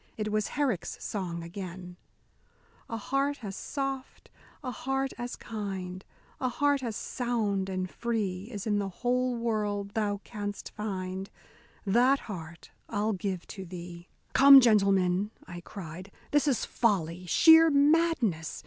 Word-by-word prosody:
It 215 Hz, -1 st, -2 dB
was 215 Hz, -1 st, +1 dB
Herrick's 260 Hz, -, -1 dB
song 175 Hz, -5 st, -4 dB
again: 180 Hz, 0 st, -7 dB, 0.9 s
A 230 Hz, -, -3 dB
heart 275 Hz, +4 st, -1 dB
as 195 Hz, -2 st, -5 dB
soft, 270 Hz, 0 st, -5 dB, 0.3 s
a 255 Hz, -, -3 dB
heart 270 Hz, +1 st, -2 dB
as 240 Hz, 0 st, -4 dB
kind, 190 Hz, -4 st, -5 dB, 0.4 s
A 255 Hz, -, 0 dB
heart 285 Hz, +2 st, +1 dB
as 230 Hz, -4 st, -3 dB
sound 210 Hz, -7 st, -1 dB
and 185 Hz, -1 st, -2 dB
free 200 Hz, -4 st, -2 dB
Is 205 Hz, -4 st, -5 dB
in 205 Hz, -2 st, +1 dB
the 200 Hz, -1 st, -2 dB
whole 250 Hz, +4 st, 0 dB
world 210 Hz, -3 st, -1 dB
thou 205 Hz, -2 st, -1 dB
canst 205 Hz, -2 st, -6 dB
find, 190 Hz, -2 st, -4 dB, 0.6 s
That 245 Hz, +7 st, +4 dB
heart 170 Hz, -6 st, -9 dB, 0.2 s
I'll 215 Hz, 0 st, 0 dB
give 190 Hz, -2 st, -3 dB
to 190 Hz, -, -7 dB
thee. 175 Hz, -1 st, -9 dB, 0.2 s
"Come, 275 Hz, 0 st, +10 dB
gentlemen," 195 Hz, -4 st, +3 dB, 0.2 s
I 175 Hz, -1 st, -8 dB
cried, 180 Hz, +1 st, -9 dB, 0.2 s
"this 295 Hz, 0 st, +3 dB
is 265 Hz, -5 st, +1 dB
folly, 180 Hz, -6 st, 0 dB
sheer 320 Hz, -, +7 dB
madness. 285 Hz, -, +2 dB
210 Hz, 135 wpm, -29 LUFS, 185-250 Hz, 0.9 s, Come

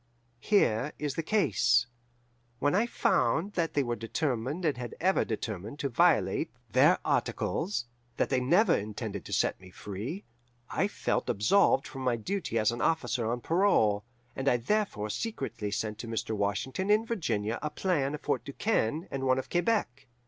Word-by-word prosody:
"Here 135 Hz, -, +2 dB
is 150 Hz, -2 st, -2 dB
the 165 Hz, -, -2 dB
case. 160 Hz, -, +3 dB, 0.7 s
When 145 Hz, +4 st, +1 dB
I 215 Hz, +6 st, +2 dB
found 200 Hz, -4 st, +1 dB
that 165 Hz, -2 st, -1 dB
they 140 Hz, -, +3 dB
were 120 Hz, -2 st, -2 dB
determined 130 Hz, +6 st, -2 dB
and 150 Hz, -, +2 dB
had 125 Hz, -1 st, -6 dB
ever 190 Hz, +2 st, +3 dB
determined 110 Hz, +1 st, -5 dB
to 140 Hz, -, -2 dB
violate 120 Hz, -, +3 dB, 0.2 s
their -, -, +5 dB
articles, 175 Hz, -9 st, -1 dB, 0.3 s
that -, -, +1 dB
they 130 Hz, -, +2 dB
never 170 Hz, -, +4 dB
intended 105 Hz, +1 st, -4 dB
to -, -, -9 dB
set -, -, +1 dB
me 95 Hz, -, -13 dB
free, 105 Hz, -, -6 dB, 0.5 s
I -, -, +1 dB
felt -, -, -2 dB
absolved 135 Hz, -, +3 dB
from 135 Hz, -, -8 dB
my 125 Hz, -2 st, +1 dB
duty 120 Hz, -, -3 dB
as 110 Hz, 0 st, +3 dB
an 120 Hz, -, -4 dB
officer 130 Hz, -8 st, 0 dB
on 120 Hz, 0 st, -2 dB
parole, 115 Hz, -, +3 dB, 0.3 s
and 135 Hz, +1 st, +1 dB
I 125 Hz, -, +3 dB
therefore 120 Hz, -, -1 dB
secretly 120 Hz, -, -3 dB
sent 105 Hz, +1 st, -3 dB
to 115 Hz, -, -6 dB
Mr. 115 Hz, 0 st, -2 dB
Washington 105 Hz, -, -1 dB
in 215 Hz, +2 st, +4 dB
Virginia 115 Hz, -, -1 dB
a 150 Hz, -, -2 dB
plan 150 Hz, -5 st, 0 dB
of 150 Hz, -, -9 dB
Fort -, -, -1 dB
Du 140 Hz, -, -8 dB
Quesne 165 Hz, -, 0 dB
and 135 Hz, -1 st, -3 dB
one 130 Hz, 0 st, +4 dB
of 130 Hz, -, -4 dB
Quebec. 175 Hz, -, 0 dB
135 Hz, 170 wpm, -29 LUFS, 115-175 Hz, 0.7 s, their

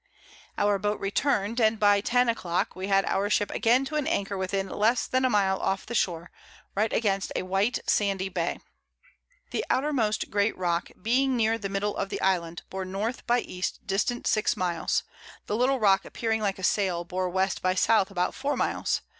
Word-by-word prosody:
Our 205 Hz, -1 st, +2 dB
Boat 210 Hz, +1 st, -1 dB
return'd, 215 Hz, +1 st, 0 dB
and 220 Hz, 0 st, +3 dB
by 205 Hz, -1 st, +4 dB
10 245 Hz, +3 st, +2 dB
a 230 Hz, -, +3 dB
Clock 175 Hz, -5 st, -2 dB
we 185 Hz, +1 st, -4 dB
had 195 Hz, -1 st, +3 dB
our 200 Hz, +1 st, 0 dB
Ship 205 Hz, -1 st, +1 dB
again 245 Hz, +4 st, +2 dB
to 305 Hz, +3 st, -3 dB
an 295 Hz, -, -1 dB
Anchor 200 Hz, 0 st, -1 dB
within 195 Hz, +1 st, -2 dB
less 220 Hz, +5 st, +1 dB
than 255 Hz, 0 st, 0 dB
a 255 Hz, -, +3 dB
Mile 195 Hz, -4 st, +2 dB
off 195 Hz, 0 st, -1 dB
the 235 Hz, -, -6 dB
Shore, 175 Hz, -6 st, -1 dB, 0.4 s
right 215 Hz, +2 st, 0 dB
against 195 Hz, -3 st, 0 dB
a -, -, -1 dB
white 195 Hz, +6 st, +1 dB
sandy 195 Hz, -2 st, +1 dB
Bay. 175 Hz, -2 st, -2 dB, 0.9 s
The -, -, -1 dB
outermost 255 Hz, -6 st, 0 dB
great 205 Hz, +1 st, +1 dB
Rock 175 Hz, -2 st, -1 dB
being 255 Hz, +5 st, +1 dB
near 225 Hz, 0 st, +2 dB
the 195 Hz, -, -4 dB
Middle 200 Hz, +1 st, -1 dB
of 195 Hz, -, -2 dB
the -, -, -4 dB
Island, 175 Hz, -3 st, 0 dB
bore 190 Hz, -, -4 dB
N. 195 Hz, +5 st, -2 dB
by 240 Hz, 0 st, +3 dB
E. 180 Hz, -, -9 dB, 0.2 s
distant 215 Hz, +5 st, -1 dB
6 215 Hz, -, +1 dB
Miles; 175 Hz, -3 st, 0 dB, 0.4 s
the 210 Hz, -, -2 dB
little 255 Hz, +3 st, +2 dB
Rock 195 Hz, -3 st, +4 dB
appearing 225 Hz, -1 st, -2 dB
like 200 Hz, -2 st, -1 dB
a 190 Hz, -, -9 dB
Sail 180 Hz, -3 st, +1 dB
bore 185 Hz, +1 st, -2 dB
W. 190 Hz, +1 st, +2 dB
by 185 Hz, 0 st, +2 dB
S. 185 Hz, -, +1 dB
about 195 Hz, -4 st, +2 dB
4 285 Hz, +1 st, -2 dB
Miles. -, -, 0 dB
200 Hz, 195 wpm, -27 LUFS, 190-225 Hz, 0.9 s, by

